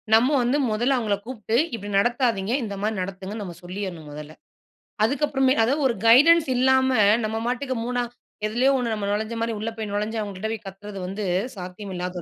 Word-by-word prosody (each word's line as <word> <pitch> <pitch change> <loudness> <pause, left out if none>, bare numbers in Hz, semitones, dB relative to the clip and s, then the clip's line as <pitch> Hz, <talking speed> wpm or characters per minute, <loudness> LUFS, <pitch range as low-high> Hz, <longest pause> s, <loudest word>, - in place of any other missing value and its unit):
நம்ம 245 +5 +4
வந்து 255 +4 +2
மொதல்ல 240 +5 +2
அவுங்கள 215 -4 0
கூப்ட்டு 225 -3 -3 0.2
இப்டி 205 -2 -7
நடத்தாதீங்க. 230 -2 +1
இந்த 205 -2 -4
மாரி 215 +1 0
நடத்துங்கன்னு 195 +3 -5
நம்ம 175 -3 -7
சொல்லியர்ணும் 180 -4 -6
மொதல்ல. 150 +1 -9 0.7
அதுக்கு 280 +5 +1
அப்றமே 265 -1 +2
அதா 250 +5 +2
ஒரு 235 - 0
கைடன்ஸ் 300 +5 +7
இல்லாம 260 +1 +4 0.4
நம்ம 220 +1 -2
மாட்டுக்கு 255 +2 -2
மூணா 245 0 -1 0.5
எதிலயோ 245 +5 +2
ஒண்ணு 235 -3 -1
நம்ம 200 -1 -3
நுழைந்து 215 +2 -2
மாரி, 230 0 0
உள்ள 220 - -2
போய் 215 -2 -4
நுழைந்து 210 +2 -2
அவுங்க 200 -2 -5
கிட்ட 220 +3 -3
போய் 215 - -8
கத்துறது 200 +1 -9
வந்து 200 +2 -4 0.3
சாத்தியம் 185 +2 -7
இல்லாத 180 0 -4
220 Hz, 180 wpm, -24 LUFS, 200-245 Hz, 0.7 s, கைடன்ஸ்